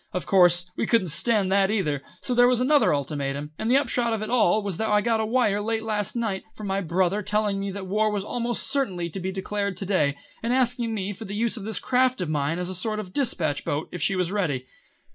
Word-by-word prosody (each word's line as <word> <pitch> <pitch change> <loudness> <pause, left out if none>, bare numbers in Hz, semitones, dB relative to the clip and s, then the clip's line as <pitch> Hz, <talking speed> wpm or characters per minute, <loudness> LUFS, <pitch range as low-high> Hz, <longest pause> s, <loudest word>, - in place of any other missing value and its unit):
Of 180 - -2
course 180 -1 +4
we - - -1
couldn't 215 -7 +2
stand 200 +3 +1
that 195 0 +3
either, 160 -10 0 0.2
so 250 - -2
there 245 0 +6
was 250 -1 +3
another 285 +3 +4
ultimatum, 140 0 -2
and 220 - -1
the 260 - +5
upshot 245 -4 +1
of 215 -1 -2
it 215 - -5
all 220 -3 +3
was 195 -4 -3
that 220 - -1
I 210 0 +4
got 225 +1 +1
a 220 - 0
wire 215 -4 +2
late 225 +1 -1
last 210 -1 -2
night 220 -5 -1
from 215 - -8
my 195 0 -1
brother 185 +3 0
telling 210 0 0
me 200 0 -3
that 195 0 -6
war 215 +3 +1
would 205 -2 -2
almost 240 +2 -2
certainly 185 -12 -1
be 190 +3 -4
declared 200 0 -3
to 195 - -2
day, 150 -8 +1 0.2
and 230 +2 0
asking 245 -3 +1
me 200 0 -3
for 220 +3 -9
the 200 - -5
use 230 +2 0
of 210 -4 -6
this 220 -3 -1
craft 255 +2 +2
of 180 -4 -2
mine 150 +1 0
as 180 0 -2
a 185 - -3
sort 215 +4 -2
of 185 -3 -7
dispatch 170 - 0
boat 145 +2 -3
if 180 - -6
she 195 - +2
was 180 -1 0
ready. 155 -11 -1
200 Hz, 245 wpm, -25 LUFS, 180-225 Hz, 0.2 s, there